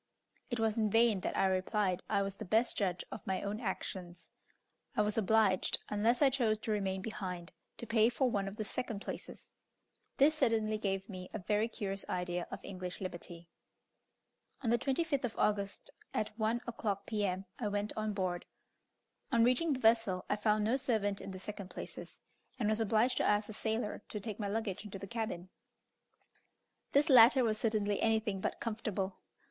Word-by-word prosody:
It 240 -2 -2
was 220 -1 +1
in 215 -2 +2
vain 225 -1 +4
that - - -3
I - - +4
replied 190 0 +1
I 200 -2 +2
was 195 0 -3
the 210 - -8
best 220 +5 +2
judge 185 -4 0
of - - -6
my 190 -1 -1
own 205 +2 -2
actions; 180 -5 -5 0.7
I 210 - +5
was 210 0 0
obliged, 215 -3 +3
unless 225 +6 +2
I 275 - +6
chose 235 -5 +2
to 220 - -2
remain 190 -2 -1
behind, 185 -5 -5 0.3
to - - -6
pay 225 0 +4
for 255 +2 +1
one 200 -5 0
of 195 - -5
the 215 - -3
second 210 0 -3
places. - - -8 0.7
This 290 +3 +6
certainly 225 -7 +1
gave 195 -2 -1
me 185 -3 -7
a - - 0
very 210 +3 +1
curious 195 -3 -3
idea 180 -1 -2
of - - -6
English 185 -2 -6
liberty. 175 -2 -7 1.2
On 230 - +2
the 235 - +3
25th 280 +2 0
of 240 -3 -3
August, 200 -1 0 0.2
at 215 0 -1
1 225 +2 0
o'clock, 205 -4 -2
P.M., 195 -3 -1
I 225 - -1
went 205 +1 -1
on 215 0 -1
board. 185 -3 -2 0.8
On 235 -2 +5
reaching 255 +6 +3
the 260 - -3
vessel 225 -5 +3
I - - +1
found 210 0 +2
no 230 +5 +2
servant 215 -6 0
in - - -7
the 190 - -6
second 200 0 -7
places, - - -8 0.4
and 230 -4 0
was 215 +1 +2
obliged 225 +3 +2
to - - +2
ask 210 +1 +2
a - - -5
sailor 220 0 -2
to 210 - -4
take 210 0 -6
my 205 - -1
luggage 205 -1 -2
into 205 -2 -7
the 195 - -7
cabin. 195 -5 -4 1.4
This 285 +3 +4
latter 255 -1 +8
was 215 -2 +1
certainly 210 -2 +1
anything 220 -3 +1
but - - -2
comfortable. 210 -4 -3
210 Hz, 185 wpm, -34 LUFS, 195-225 Hz, 1.4 s, latter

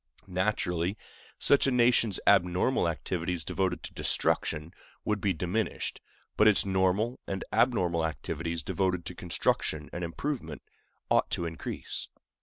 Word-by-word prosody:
Naturally, 90 -1 -1 0.4
such 140 -1 +6
a - - +2
nation's 120 -4 +3
abnormal 90 +3 +3
activities 85 0 -3
devoted 95 +2 -1
to - - -8
destruction 75 +3 0 0.3
would 105 -2 0
be 100 - +2
diminished; 90 +6 -2 0.4
but 105 - +6
its 105 -3 +5
normal 95 +5 +1
and 95 -1 -3
abnormal 90 -8 +2
activities 80 +1 -3
devoted 90 -3 -1
to 90 - -5
construction 80 -3 -1
and 90 - -4
improvement 85 - -4 0.5
ought - - +3
to 85 - -1
increase. 80 -1 -5
90 Hz, 125 wpm, -29 LUFS, 85-105 Hz, 0.5 s, such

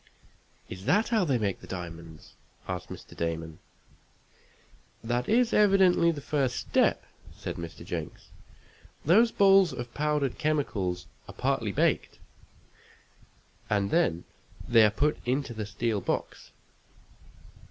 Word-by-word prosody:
"Is 95 +1 -9
that 210 +4 +2
how 225 -4 +2
they 135 -6 +1
make 100 -4 -2
the - - -12
diamonds?" 85 -3 -9 0.3
asked 90 -1 -5
Mr. - - -11
Damon. 80 -1 -4 1.4
"That 120 +2 -2
is 240 +1 +3
evidently 195 -4 +4
the 155 -4 -2
first 135 -4 -1
step," - - +1 0.3
said - - -5
Mr. 85 -1 -8
Jenks. - - -6 0.8
"Those 220 +9 +5
balls 195 -3 +5
of 120 -1 -7
powdered 150 -3 -1
chemicals 115 - -1 0.2
are - - -11
partly - - -1
baked, - - 0 1.5
and 100 -1 0
then 160 - +1 0.4
they 115 -2 +6
are 105 - +6
put 145 +8 0
into 130 +1 -1
the 110 -2 -5
steel 105 0 -2
box. - - -4
125 Hz, 120 wpm, -28 LUFS, -, 1.5 s, they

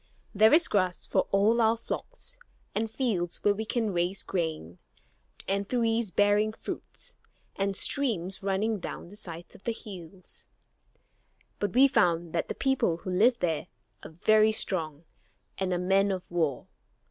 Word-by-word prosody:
There 215 +2 +5
is 320 +2 +6
grass 185 -3 0
for - - 0
all 215 +4 +3
our 225 +1 +3
flocks, - - -6 0.3
and 225 +1 -1
fields 215 -8 -2
where 205 - +4
we 220 +2 -4
can 220 -2 -1
raise 175 +3 0
grain, 155 - -3 0.7
and 200 +1 -1
trees 230 -3 +1
bearing 205 +3 +2
fruits, - - -8 0.4
and 195 0 -1
streams 195 -10 +2
running 200 +2 0
down 175 - -7
the 200 - -12
sides 170 -5 -8
of - - -15
the 235 - -1
hills. 185 -5 -11 1.1
But 205 -3 -2
we 270 +2 +7
found 175 - +1
that 170 - -1
the - - -3
people 265 -11 +1
who 185 +2 -6
live 230 +7 +4
there 165 -3 -1 0.3
are - - -9
very 215 +6 +3
strong 160 -8 -2 0.6
and 190 -1 -1
are 180 - +1
men 195 +3 +2
of 185 -2 -4
war. 160 -6 -1
200 Hz, 155 wpm, -28 LUFS, 175-225 Hz, 1.1 s, we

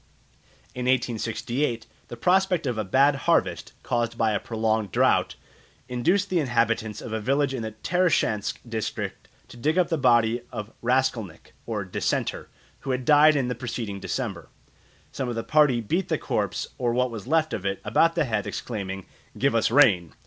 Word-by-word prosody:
In 125 0 -4
1868 120 0 -1 0.2
the 120 - -8
prospect 180 +3 +2
of 120 -4 -1
a - - 0
bad 135 +8 +3
harvest, - - +1
caused 120 -1 -1
by 110 -2 +2
a 105 - 0
prolonged 110 -3 -1
drought, - - +2 0.5
induced 175 +12 +1
the 180 - +2
inhabitants 115 -5 0
of 110 - -7
a 110 - -1
village 135 +4 +1
in 130 - -3
the 110 -1 -5
Tarashchansk 165 - +1
district 110 -2 -4 0.2
to - - -13
dig 155 +8 0
up 180 -2 +3
the 165 -3 0
body 120 -2 +3
of 105 0 -6
a - - -26
Raskolnik, 120 -7 -1
or 105 -4 -3
Dissenter, 95 - -2 0.3
who - - -8
had 130 -1 -1
died 150 +2 +6
in 135 -3 +1
the 125 - -1
preceding 115 -5 -5
December. - - -4 0.6
Some 130 -2 -3
of 120 - -3
the 115 - -3
party 150 -6 +3
beat 170 - -1
the - - +1
corpse, - - -2
or 120 -2 +1
what 125 0 +1
was 115 0 -7
left 160 +1 +1
of 95 - -3
it, 100 0 -2
about 165 +10 +3
the 165 -3 +2
head, 110 -5 -2
exclaiming, 95 -5 -5 0.3
"Give 140 -1 +2
us 115 -1 +2
rain!" 105 - +4
120 Hz, 180 wpm, -25 LUFS, 110-140 Hz, 0.6 s, died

